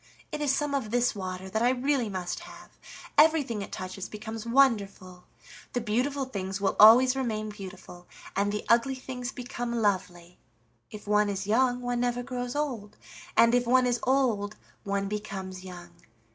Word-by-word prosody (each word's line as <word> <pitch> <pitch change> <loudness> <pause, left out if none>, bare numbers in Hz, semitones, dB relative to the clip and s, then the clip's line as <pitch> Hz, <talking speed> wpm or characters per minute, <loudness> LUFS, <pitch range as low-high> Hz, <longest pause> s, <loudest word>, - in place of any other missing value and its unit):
It 300 -1 -4
is 290 -2 +2
some 290 +1 -1
of 265 -6 -1
this 245 +2 +1
water 185 -2 -6
that 220 +4 -2
I 240 - +4
really 260 -2 0
must 185 -2 -4
have: 350 +1 -13 0.5
everything 300 -8 +4
it - - -7
touches 185 0 -6
becomes 220 +1 -7
wonderful. 200 -8 +1 0.5
The 245 - 0
beautiful 250 +5 -1
things 195 -5 -4
will 195 - 0
always 250 +4 +8
remain 220 -5 -2
beautiful, 190 -3 -10 0.3
and 200 +1 +1
the 210 - -4
ugly 240 +3 +3
things 255 -1 -6
become 245 -2 -5
lovely. 180 -5 -2 0.5
If 210 - -10
one 210 0 +2
is 195 -1 -3
young 245 +3 +2
one 245 0 -2
never 245 0 -1
grows 245 0 -4
old, 245 -9 -3 0.4
and 230 +1 +6
if 245 -1 +2
one 255 +1 +4
is 245 -1 +1
old 235 -6 +1 0.3
one 200 0 -1
becomes 195 -3 -5
young. 175 -2 -10
225 Hz, 165 wpm, -28 LUFS, 200-250 Hz, 0.5 s, always